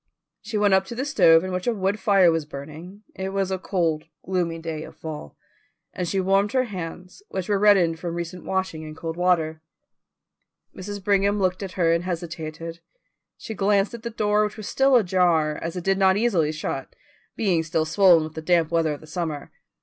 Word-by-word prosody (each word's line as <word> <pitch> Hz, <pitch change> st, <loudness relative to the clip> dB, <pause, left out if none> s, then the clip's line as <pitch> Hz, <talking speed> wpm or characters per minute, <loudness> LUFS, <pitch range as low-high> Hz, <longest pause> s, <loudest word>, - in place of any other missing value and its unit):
She 215 Hz, 0 st, -4 dB
went 205 Hz, -1 st, +3 dB
up 190 Hz, 0 st, +4 dB
to 235 Hz, -, -7 dB
the 260 Hz, +3 st, -2 dB
stove 165 Hz, -, +5 dB
in 185 Hz, -, -4 dB
which 180 Hz, +4 st, -3 dB
a 240 Hz, -, +2 dB
wood 195 Hz, +1 st, -1 dB
fire 190 Hz, -3 st, +5 dB
was 165 Hz, -2 st, -1 dB
burning 155 Hz, +8 st, -9 dB
it 190 Hz, 0 st, -4 dB
was 195 Hz, -1 st, -1 dB
a 190 Hz, -, -1 dB
cold, 165 Hz, -5 st, -1 dB, 0.2 s
gloomy 175 Hz, -3 st, -1 dB
day 165 Hz, -1 st, -5 dB
of -, -, -11 dB
fall 150 Hz, -, -8 dB, 0.6 s
and 180 Hz, -, -3 dB
she 195 Hz, +3 st, 0 dB
warmed 195 Hz, +2 st, +2 dB
her 255 Hz, -1 st, +3 dB
hands, 180 Hz, -, -7 dB
which 185 Hz, -2 st, -4 dB
were 205 Hz, -2 st, +1 dB
reddened 190 Hz, -6 st, +4 dB
from 170 Hz, 0 st, -4 dB
recent 175 Hz, +1 st, -5 dB
washing 190 Hz, -4 st, -2 dB
in 155 Hz, -1 st, -8 dB
cold 165 Hz, 0 st, -5 dB
water. 165 Hz, -3 st, +1 dB, 1.1 s
Mrs. 200 Hz, +1 st, -7 dB
Brigham 200 Hz, +1 st, +2 dB
looked 185 Hz, -1 st, 0 dB
at 190 Hz, -2 st, -5 dB
her 165 Hz, -3 st, +2 dB
and 170 Hz, +1 st, 0 dB
hesitated. 165 Hz, -1 st, -5 dB, 0.6 s
She 220 Hz, -, -7 dB
glanced 200 Hz, +1 st, +1 dB
at 235 Hz, -, -7 dB
the 235 Hz, -, -4 dB
door, 210 Hz, -1 st, +1 dB
which 210 Hz, +2 st, -3 dB
was 215 Hz, -, -7 dB
still 270 Hz, 0 st, +3 dB
ajar, 175 Hz, -7 st, +3 dB
as 165 Hz, +1 st, -4 dB
it 180 Hz, -, -4 dB
did 195 Hz, +1 st, +1 dB
not 190 Hz, 0 st, +4 dB
easily 190 Hz, -9 st, +2 dB
shut, 155 Hz, -3 st, -5 dB, 0.4 s
being 185 Hz, -7 st, +1 dB
still 155 Hz, 0 st, -1 dB
swollen 175 Hz, -1 st, +5 dB
with 155 Hz, 0 st, -7 dB
the 160 Hz, -, -6 dB
damp 165 Hz, -1 st, +2 dB
weather 165 Hz, -2 st, +1 dB
of 145 Hz, -, -9 dB
the -, -, -12 dB
summer. 155 Hz, -3 st, -4 dB
180 Hz, 205 wpm, -24 LUFS, 165-200 Hz, 1.1 s, stove